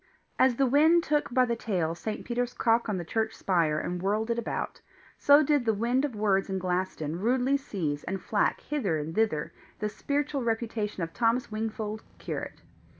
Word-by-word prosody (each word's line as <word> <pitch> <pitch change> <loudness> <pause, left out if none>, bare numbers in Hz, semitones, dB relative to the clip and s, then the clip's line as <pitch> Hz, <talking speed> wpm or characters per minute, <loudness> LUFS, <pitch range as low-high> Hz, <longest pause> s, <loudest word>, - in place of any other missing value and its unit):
As 260 -2 +5
the 270 - +3
wind 315 +6 +5
took 295 -4 0
by 255 +1 +4
the 235 -1 -1
tail 180 -8 -1
St. 210 +5 -5
Peter's 245 0 -2
cock 230 0 +2
on 205 - 0
the 175 - -4
church 220 +5 -1
spire 165 -5 +1
and 175 +3 -3
whirled 215 +4 0
it 235 - 0
about, 235 - -4 0.4
so 285 +2 +6
did 290 -2 +2
the 225 -2 +1
wind 240 +5 +1
of 265 -6 -5
words 200 -2 +1
in 190 - -1
Glaston 180 -3 -2
rudely 250 +5 +2
seize 170 - -3
and 190 +2 -3
flack 205 +3 0
hither 225 - -1
and 155 +2 -4
thither 210 -8 0 0.2
the 210 - -2
spiritual 285 +4 -2
reputation 225 -4 -2
of 165 - -5
Thomas 235 0 +1
Wingfold, 215 0 -3 0.2
curate. - - -6
220 Hz, 185 wpm, -28 LUFS, 190-250 Hz, 0.4 s, so